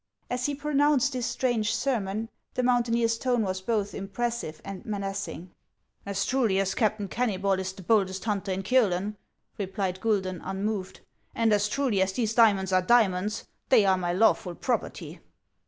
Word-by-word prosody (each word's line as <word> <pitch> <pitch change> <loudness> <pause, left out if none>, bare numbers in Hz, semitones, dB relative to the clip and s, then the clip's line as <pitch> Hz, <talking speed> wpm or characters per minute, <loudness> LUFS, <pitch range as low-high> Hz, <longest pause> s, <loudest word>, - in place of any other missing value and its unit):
As 250 +1 0
he 290 - -2
pronounced 285 -1 +2
this 250 -2 -2
strange 230 -4 0
sermon, 225 -4 -2 0.2
the 250 - 0
mountaineer's 235 -2 +2
tone 245 -3 +1
was 185 -1 -2
both 205 -1 -1
impressive 200 -4 -3
and 195 -1 -7
menacing. 195 - -4 0.3
" - - -42
As 200 -1 -1
truly 240 -7 +1
as 190 -1 0
Captain 215 -3 0
Keimybol 195 -4 0
is 190 0 -3
the 190 0 -12
boldest 195 -1 +1
hunter 200 -3 -1
in 190 +1 -2
Kiolen," 210 -3 +2 0.4
replied 190 -1 -2
Guidon, 190 -5 0
unmoved, 195 0 -3 0.2
" - - -35
and 225 -2 +3
as 210 0 +2
truly 250 -6 +1
as 190 0 +1
these 225 0 -1
diamonds 200 -5 +4
are 185 - +5
diamonds, 205 -1 +2 0.2
they 230 -6 +6
are 190 -1 +4
my 175 -1 -1
lawful 185 -2 +2
property." 245 +5 -3
210 Hz, 165 wpm, -27 LUFS, 190-235 Hz, 0.4 s, they